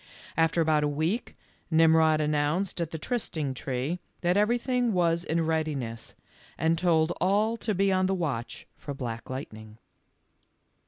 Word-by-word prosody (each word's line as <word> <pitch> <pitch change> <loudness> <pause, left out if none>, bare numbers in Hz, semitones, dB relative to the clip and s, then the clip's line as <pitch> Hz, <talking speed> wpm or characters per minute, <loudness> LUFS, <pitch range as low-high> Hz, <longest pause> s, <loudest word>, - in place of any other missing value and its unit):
After 165 +1 +2
about 155 -2 +2
a - - +2
week, 160 +10 -2 0.4
Ximrod 160 -1 +5
announced 150 +5 0
at 165 - -2
the 160 - -5
trysting 160 - -2
tree 130 +6 -3 0.2
that 175 +1 +2
everything 240 +3 +1
was 170 -2 +2
in 165 - -1
readi 160 -2 0
ness, 115 -3 -6 0.4
and 160 +1 +2
told 165 -1 +2
all 210 +4 +2
to 215 -2 -2
be 195 +1 +2
on 185 0 +2
the 190 - +1
watch 140 -10 -3
for 145 -2 -7
Black 115 -4 -5
Lightning. 110 -5 -7
160 Hz, 150 wpm, -28 LUFS, 145-185 Hz, 0.4 s, Ximrod